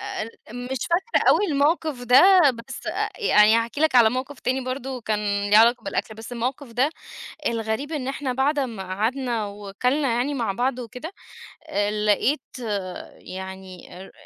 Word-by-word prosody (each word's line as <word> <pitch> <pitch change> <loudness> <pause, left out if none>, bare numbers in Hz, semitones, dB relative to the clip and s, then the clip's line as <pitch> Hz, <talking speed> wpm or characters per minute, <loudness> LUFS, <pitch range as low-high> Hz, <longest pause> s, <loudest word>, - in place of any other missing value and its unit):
أ 265 - -4
ال 220 - -6 0.4
مش 265 - -2
فاكرة 380 +8 +1
أوي 415 - +4
الموقف 295 -2 +1
ده، 250 +2 +6 0.3
بس 230 -2 -9
أ - - -1
يعني 215 - +5
هاحكي 230 +5 -2
لك 315 -3 +2
على 235 -3 +7
موقف 260 +3 -5
تاني 260 +2 0
برضه 260 0 -4
كان 205 -2 -1
ليه 210 - +7
علاقة 235 +2 +5
بالأكل، 220 - -3
بس 225 +3 -10
الموقف 250 +2 -4
ده، 255 +6 +2 0.6
الغريب 230 +5 -2
إن 285 -5 -3
إحنا 270 -1 -3
بعد 280 +3 +1
أمّا 230 -7 -3
قعدنا 225 +4 -1
وكَلنا 210 +8 -1
يعني 275 +4 0
مع 235 -7 -1
بعض 245 +5 -1
وكده، 250 +7 -7 0.6
آآ، 205 +1 0
لقيت 210 +7 +1 0.9
يعني 190 -1 -9
االر 190 +1 -11
245 Hz, 160 wpm, -24 LUFS, 215-270 Hz, 0.9 s, على